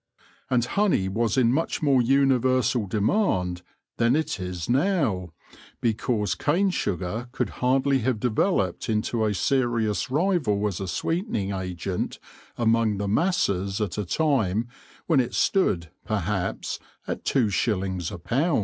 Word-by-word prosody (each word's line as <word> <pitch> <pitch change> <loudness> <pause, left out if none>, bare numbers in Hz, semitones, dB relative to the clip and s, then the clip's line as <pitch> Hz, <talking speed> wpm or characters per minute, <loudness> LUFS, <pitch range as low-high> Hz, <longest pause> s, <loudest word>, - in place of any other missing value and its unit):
And 120 -2 +2
honey 195 - +1
was 115 +6 0
in 120 -2 +4
much 155 +2 -1
more 135 -4 +4
universal 130 -3 +2
demand 95 - 0 0.4
than 120 +2 +3
it 155 -8 -1
is 90 -2 -4
now, 130 - +1 0.5
because 110 -2 0
cane 185 +6 +1
sugar 100 - -3
could - - -2
hardly 135 +2 +3
have 120 -1 0
developed 110 - 0
into 110 +1 0
a 105 -2 +1
serious 120 +2 0
rival 145 - +1
as 100 -4 -2
a 95 - -4
sweeten 170 - -2
ing 100 -2 -1
agent 90 -1 -3 0.4
among 115 -2 +2
the 100 0 -2
masses 100 - +1
at 105 -1 -2
a - - 0
time 115 - +1 0.4
when 160 -5 +3
it 125 - -1
stood, 90 - +1
perhaps, 100 -2 -2 0.3
at - - -4
two 115 -6 +2
shillings 95 -3 -1
a - - -6
pound. 130 - +1
115 Hz, 140 wpm, -25 LUFS, 100-135 Hz, 0.5 s, in